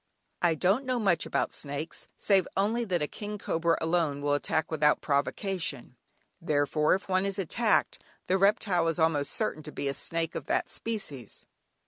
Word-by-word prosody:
I 170 -2 +3
don't 195 - +2
know 255 -1 +1
much 195 -7 +2
about - - -1
snakes, 145 +2 -4
save 195 -3 +3
only 225 +5 +1
that 175 -6 0
a - - -1
"king 210 +4 -6
cobra" 165 -3 0
alone 160 -4 +1
will 145 0 +2
attack 155 +2 0
without 150 -1 +3
provocation; 145 - -2 0.5
therefore, 150 0 +2
if 195 - -6
one 185 0 +2
is 195 0 -1
attacked, 210 +4 +1 0.2
the 190 +1 +1
reptile 195 -3 +3
is 165 - 0
almost 160 -4 +2
certain 155 - -1
to 150 0 -9
be 140 - -3
a 140 - 0
snake 165 +3 -1
of - - -6
that - - 0
species. 150 - -5
165 Hz, 170 wpm, -29 LUFS, 150-195 Hz, 0.5 s, I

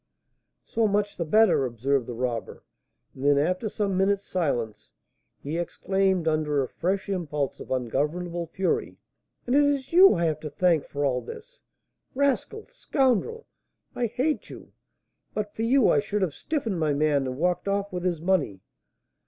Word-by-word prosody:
"So 225 -1 +1
much 205 0 0
the 170 - -2
better," 215 -3 +4
observed 130 +1 -1
the 120 - -5
robber. 120 -1 -4 0.5
And 130 - -10
then, 145 0 +4
after 180 +9 0
some 200 -2 -1
minutes' 195 +1 +1
silence, 120 - -2 0.5
he 155 +4 -3
exclaimed, 190 0 0
under 150 -3 +1
a - - -4
fresh 190 +7 -2
impulse 150 -8 -2
of - - -10
ungovernable 155 +8 -2
fury, 185 +3 -2 0.5
"And 245 - +1
it 290 - +6
is 285 0 0
you 375 - +8
I 170 -1 0
have 155 -2 0
to 155 - -6
thank 165 -1 +1
for 145 0 -2
all 125 -2 0
this! - - -11 0.5
Rascal! 280 - 0
scoundrel! 455 - 0 0.5
I 240 - -1
hate 260 +7 -1
you! - - -11 0.6
But 210 -1 -3
for - - -5
you, 245 +2 +4
I - - +4
should 210 -1 -1
have 170 -6 -1
'stiffened' 230 - -3
my 155 -2 +1
man 145 -2 +1
and 130 0 -4
walked 180 +4 0
off 200 0 -1
with 180 -1 -3
his 175 -3 0
money. 160 - 0
180 Hz, 165 wpm, -26 LUFS, 145-215 Hz, 0.6 s, you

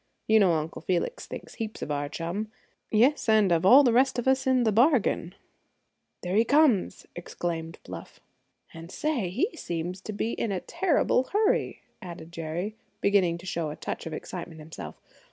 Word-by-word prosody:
You 220 0 +5
know 190 -4 +4
Uncle 160 +1 -3
Felix 185 - -2
thinks - - -8
heaps 220 -2 -5
of 150 - -4
our 145 0 -2
chum; 170 +8 -4 0.4
yes, 240 +4 +3
and 215 -4 +4
of 170 +2 +3
all 265 +7 +9
the 245 -4 +3
rest 260 +1 +3
of 245 - -2
us 265 0 +2
in 260 -1 +3
the 220 - +2
bargain." 225 - +2 0.9
"There 180 +1 -2
he 220 - +5
comes!" 280 -5 +2
exclaimed 165 -1 -4
Bluff. - - -10 0.5
"And, 165 +1 -10
say, 255 - -1
he 275 - -1
seems 175 +2 -4
to 215 - -6
be 215 +2 -2
in 225 - -2
a 190 - -1
terrible 295 - +1
hurry," 420 - 0 0.2
added 170 -2 -9
Jerry, 170 +5 -4 0.2
beginning 190 -4 +2
to 175 - -13
show 170 -3 -2
a 150 - -6
touch - - -5
of 160 - -6
excitement 170 0 -7
himself. 155 +1 -9
195 Hz, 175 wpm, -27 LUFS, 170-245 Hz, 0.9 s, all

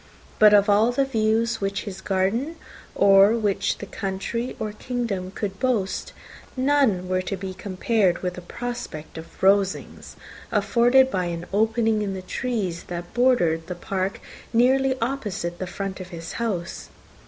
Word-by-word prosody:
But 215 -1 +8
of 205 0 +5
all 210 +3 +4
the 275 +2 +1
views 225 -2 +1
which 195 0 -2
his 195 -3 -7
garden, 205 - 0 0.4
or 195 +1 +6
which 200 -3 0
the - - -7
country 200 +5 -4
or 215 -1 -3
the 210 - -17
kingdom 230 -8 -3
could 195 0 -5
boast, 225 -7 -1 0.5
none 260 -9 +2
were 185 0 0
to 195 +1 -4
be 190 0 -5
compared 190 0 0
with 180 -1 -1
the 180 - -8
prospect 205 -7 -6
of 160 - -13
Rosings, 195 0 +1 0.4
afforded 260 +2 +4
by 185 -2 0
an 170 0 -4
opening 220 +1 +2
in 195 -2 -2
the 185 - -6
trees 195 -5 -3
that 175 0 -7
bordered 200 -10 +2
the 180 - -4
park 190 +2 -3 0.3
nearly 260 +3 +3
opposite 205 -9 -3
the 185 - -3
front 195 +1 -5
of 185 - -7
his 165 -2 -7
house. 190 -7 -3
200 Hz, 155 wpm, -24 LUFS, 185-235 Hz, 0.5 s, But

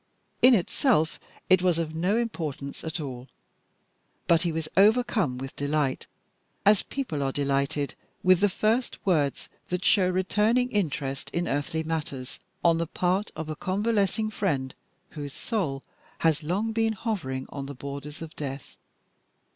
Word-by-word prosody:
In 250 0 +8
itself 185 - +2 0.3
it 185 -1 +5
was 180 -2 +3
of 160 -2 -2
no 180 +7 +1
importance 155 - -3
at 160 +1 -3
all, 130 -4 -6 1.0
but 165 -1 +4
he 170 - 0
was 160 -1 -3
overcome 210 - +4
with 135 +1 -6
delight, 145 -2 -1 0.6
as 205 0 +6
people 250 - -3
are 135 -1 0
delighted 140 +1 0 0.3
with 185 -1 +6
the 205 +1 +4
first 220 +6 0
words 150 -7 +1 0.2
that 180 0 -2
show 185 -3 +5
returning 210 +7 +2
interest 140 -8 -1
in 175 +1 0
earthly 150 +3 -1
matters 150 -5 -4 0.3
on 165 -1 +5
the 170 - -1
part 185 +5 0
of 160 - -5
a 155 - -3
convalescing 205 +3 0
friend 140 -11 -1 0.4
whose 145 -2 -6
soul 160 - -2 0.3
has 160 -3 +2
long 190 +8 -1
been 225 0 +1
hovering 175 - -3
on 140 -1 -6
the 140 - -7
borders 140 +3 -7
of 160 - -10
death. 135 -2 -6
165 Hz, 145 wpm, -27 LUFS, 140-205 Hz, 1.0 s, In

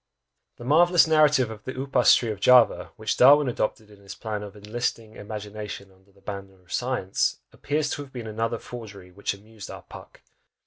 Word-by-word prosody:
The - - -10
marvellous 170 +6 +5
narrative 150 -6 +3
of 110 -2 -10
the 130 - -5
upas 135 -2 +4
tree 115 -3 -1
of 105 - -6
Java, 125 +2 +5
which 110 0 -2
Darwin 145 +2 +7
adopted 110 -3 -3
in 100 -1 -17
his 100 - -10
plan 105 -2 -5
of 105 -1 -9
"enlisting 110 +1 -4
imagination 105 -1 -7
under 95 +1 -26
the 100 0 -25
banner 95 -2 -8
of 85 - -11
science," 120 -7 -1 0.2
appears 150 +1 -2
to - - -3
have 140 -2 -11
been 120 -3 -7
another 115 +1 -2
forgery 100 -7 -10
which 100 +2 -3
amused 105 0 -12
our - - -9
"Puck." - - -14
110 Hz, 185 wpm, -25 LUFS, 100-125 Hz, 0.2 s, Darwin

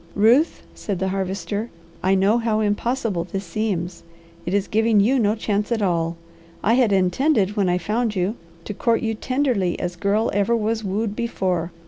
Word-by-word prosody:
"Ruth," 235 +10 +3
said 200 -3 -4
the 190 +1 -1
Harvester, 195 +3 -3 0.3
"I 190 +1 +3
know 200 +5 +3
how 225 -2 0
impossible 215 -2 0
this 195 +2 -5
seems. 175 -2 -3 0.5
It 175 - -1
is 200 -1 0
giving 220 0 +3
you 250 +7 +3
no 210 -1 +2
chance 210 0 -1
at 225 -3 +1
all. 170 -2 0 0.5
I 225 - +3
had 240 -3 +3
intended, 200 - +2
when 200 -4 +1
I 180 - +2
found 215 +5 -1
you, 190 +4 0 0.3
to 210 - -4
court 230 +3 +1
you 225 -1 0
tenderly 245 -6 0
as 175 0 -3
girl 205 +5 +1
ever 205 +4 +2
was 220 0 -1
wooed 205 +2 -2
before. 185 -7 -1
205 Hz, 175 wpm, -22 LUFS, 190-225 Hz, 0.5 s, Ruth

